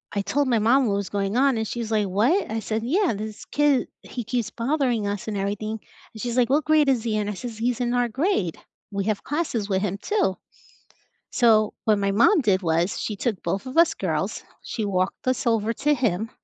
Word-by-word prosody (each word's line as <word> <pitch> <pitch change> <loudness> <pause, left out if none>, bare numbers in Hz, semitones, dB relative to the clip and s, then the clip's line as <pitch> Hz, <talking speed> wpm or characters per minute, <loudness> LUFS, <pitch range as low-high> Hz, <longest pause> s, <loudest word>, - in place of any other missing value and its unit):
I 200 - +1
told 265 +8 0
my 235 -3 +2
mom 245 +4 +4
what 200 - +1
was 200 -2 -3
going 200 +2 -1
on 270 -3 +3
and 220 -1 -2
she's 230 -2 -4
like, 210 -2 +1
"What?" 230 - +2
I 225 - -1
said, 220 0 -3
"Yeah, 340 - +1
this 215 +1 -7
kid, 290 -4 +2
he 245 - -6
keeps 235 -1 -2
bothering 245 -4 0
us 205 +1 -4
and 210 -2 -2
everything." 210 +2 -3 0.3
And 220 - -9
she's 240 0 -3
like, 245 0 +3
"What 295 +2 +2
grade 310 -2 +4
is 245 -4 +2
he 220 -2 -1
in?" 210 0 -1
I - - -2
says, 225 +2 -7
"He's 240 +1 -1
in 245 0 0
our 245 -1 +1
grade. 265 - 0 0.3
We 200 -1 -2
have 215 -2 -1
classes 290 -9 -2
with 190 -1 +1
him 200 -1 -2
too." 205 - 0 1.0
So 220 -3 +3
what 215 -2 +3
my 200 0 0
mom 310 - +5
did 200 -6 +2
was 170 +3 0
she 210 - -3
took 215 -3 -2
both 195 +7 -2
of 255 - -7
us 335 0 +6
girls, - - -2 0.2
she 220 - -4
walked 185 +3 -1
us 255 0 0
over 225 -1 +2
to 295 +5 +1
him, 225 -4 -1
225 Hz, 225 wpm, -24 LUFS, 205-255 Hz, 1.0 s, us